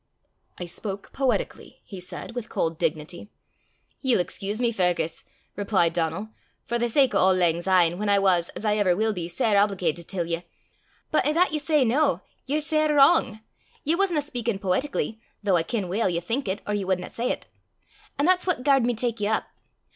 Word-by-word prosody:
"I 180 - -3
spoke 195 +3 -5
poetically," 270 -2 -2
he 195 - -9
said, 180 +5 -7
with 240 -2 -5
cold 165 -5 -2
dignity. 155 +6 -3 0.7
"Ye'll 255 -6 +2
excuse 200 +4 -2
me, 240 -1 +2
Fergus," 180 -5 0 0.3
replied 195 -5 +1
Donal, 170 +5 -2 0.2
" - - -43
for 235 0 -1
the 240 0 0
sake 265 +1 +3
o' - - +3
auld 185 0 +4
langsyne, 175 0 +2
whan 210 0 -1
I 200 - +5
was, 185 -3 +2
as - - -6
I 210 0 +2
ever 190 -4 +3
will 220 +2 +1
be, 175 -4 -4
sair 175 +5 0
obligatit 180 -5 +1
till 180 -3 -2
ye 165 0 -2 0.7
but 310 - +3
i' 300 - +1
that 345 0 +3
ye 305 - 0
say 300 -2 +2
noo, 270 +7 +2 0.3
ye're 295 +3 0
sair 310 0 +3
wrang: 250 -5 +4 0.4
ye 310 - +1
wasna 350 -4 +1
speykin' 235 -7 -3
poetically, 215 +4 -1 0.2
though 195 -3 +3
I 170 - +3
ken 200 +2 -3
weel 195 +4 0
ye 170 -1 0
think 225 +9 -2
it, 190 +2 -2
or 210 - -2
ye 205 -1 -1
wadna 185 -1 -1
say 240 +2 -1
't; - - -20 0.7
an' 285 - +1
that's 365 +1 +3
what 340 -8 +1
garred 270 -3 +4
me 245 - 0
tak 230 0 -2
ye 205 - +1
up. 220 - +1
210 Hz, 200 wpm, -25 LUFS, 180-250 Hz, 0.7 s, I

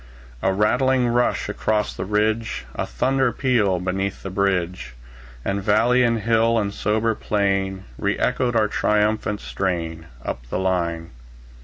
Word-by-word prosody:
A 95 - +2
rattling 125 +5 +2
rush 120 +1 +1
across 105 -1 -1
the - - -5
ridge, 110 - 0
A - - -3
thunder 130 - +1
peal 110 -10 +1
beneath 95 +2 -2
the 95 - -5
bridge; 90 -10 -1 0.5
And 100 0 -1
valley 120 +5 +3
and 115 -2 +2
hill 115 +1 +3
and 100 -2 -1
sober 110 +3 +1
plain 95 -2 -1 0.2
Re 100 0 0
echoed 125 -1 0
our 110 -2 +3
triumphant 105 0 0
strain, 85 -4 -3 0.2
Up - - -5
the - - -2
line. 85 -3 -1
105 Hz, 140 wpm, -22 LUFS, 95-115 Hz, 0.5 s, valley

